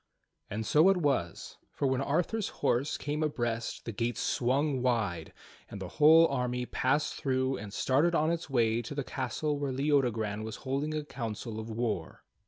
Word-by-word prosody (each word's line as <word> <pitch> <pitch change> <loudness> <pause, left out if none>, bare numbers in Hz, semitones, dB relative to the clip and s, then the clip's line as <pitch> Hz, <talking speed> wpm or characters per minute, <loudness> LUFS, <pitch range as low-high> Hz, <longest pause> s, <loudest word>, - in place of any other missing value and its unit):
And 110 +2 -3
so 155 - +5
it 195 - +4
was, 140 - -1
for - - -3
when 130 0 +1
Arthur's 175 +10 0 0.2
horse 135 +5 +1
came 150 +1 -3
abreast 120 -6 -2
the 115 - -3
gates 115 +3 -2
swung 135 +2 +1
wide, 110 -10 0 0.4
and 100 - -7
the 95 -2 -6
whole 160 +2 +8
army 125 -2 -1
passed 140 +5 0
through 130 -1 0
and 100 0 -8
started 145 - +2
on 155 +1 +2
its 170 -2 -3
way 115 -3 +2
to 120 +5 -7
the 140 - -1
castle 140 +5 -2
where 140 -2 -1
Leodogran 125 -7 0
was 110 0 -5
holding 140 +4 -1
a 155 - -2
council 115 -4 -5
of 110 +1 -6
war. 110 -7 -3
130 Hz, 175 wpm, -30 LUFS, 115-150 Hz, 0.4 s, whole